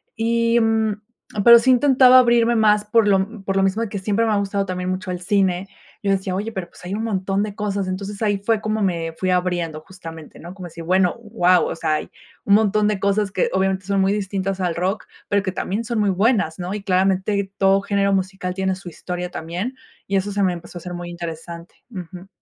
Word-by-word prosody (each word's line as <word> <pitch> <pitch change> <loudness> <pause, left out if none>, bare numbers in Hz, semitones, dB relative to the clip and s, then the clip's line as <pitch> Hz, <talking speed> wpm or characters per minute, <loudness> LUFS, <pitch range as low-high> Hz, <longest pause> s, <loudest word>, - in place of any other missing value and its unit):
y, 230 +1 +2
mm, 220 -2 +1 0.4
pero, 235 0 +9
sí 260 +3 +3
intentaba 255 0 +6
abrirme 235 -1 +3
más 210 -1 +3
por 225 0 +3
lo 200 +2 0
por 195 0 -1
lo 195 - +3
mismo 195 +4 +1
de 230 - -2
que 200 -1 -4
siempre 210 +3 0
me 220 - +1
ha 205 - +2
gustado 200 0 -1
también 180 -1 -3
mucho 185 0 -3
el 180 - -4
cine. 190 -1 +1 0.3
Yo 200 - -1
decía 190 -1 -1
oye, 210 +4 -3
pero, 180 -4 -5
pues, - - -15
hay 185 - -4
un 220 - -2
montón 195 -2 -1
de 210 - -4
cosas, 200 -2 -2
entonces 200 +3 -5
ahí 205 -2 +1
fue 215 +2 0
como 215 0 -1
me 170 -4 -1
fui 185 - -1
abriendo 175 -3 -1
justamente, 165 -3 -11
¿no? 175 +2 -9
Como 185 -3 -9
si, 165 - -13
bueno, 180 +1 +2
wao, 195 -5 +2
o - - -3
sea, 155 -1 0
hay - - -4 0.4
un 200 - +3
montón 210 0 +3
de 210 -2 0
cosas 200 0 +1
que 185 - 0
obviamente 190 0 0
son 200 0 0
muy 195 +1 +2
distintas 195 -1 -2
al 175 -2 0
rock, 185 +4 -2 0.2
pero, 200 -1 +1
que 185 - -2
también 200 +4 -3
son 230 -1 -2
muy 205 -2 +2
buenas, 200 -4 +1
¿no? 180 +2 -4
Y 210 - -4
claramente 195 +1 +1
todo 195 0 +3
género 200 -1 +1
musical 190 -1 -2
tiene 190 0 -1
su 185 -1 -12
historia 180 +1 -5
también, 180 +11 -4 0.3
y 195 - -2
eso 195 +1 0
se 200 0 -1
me 185 - +2
empezó 175 +1 -9
a 175 - -8
ser 180 0 -7
muy 175 0 -6
interesante. 170 0 -8 0.2
Ujú. 180 -1 -9
195 Hz, 230 wpm, -21 LUFS, 180-210 Hz, 0.4 s, pero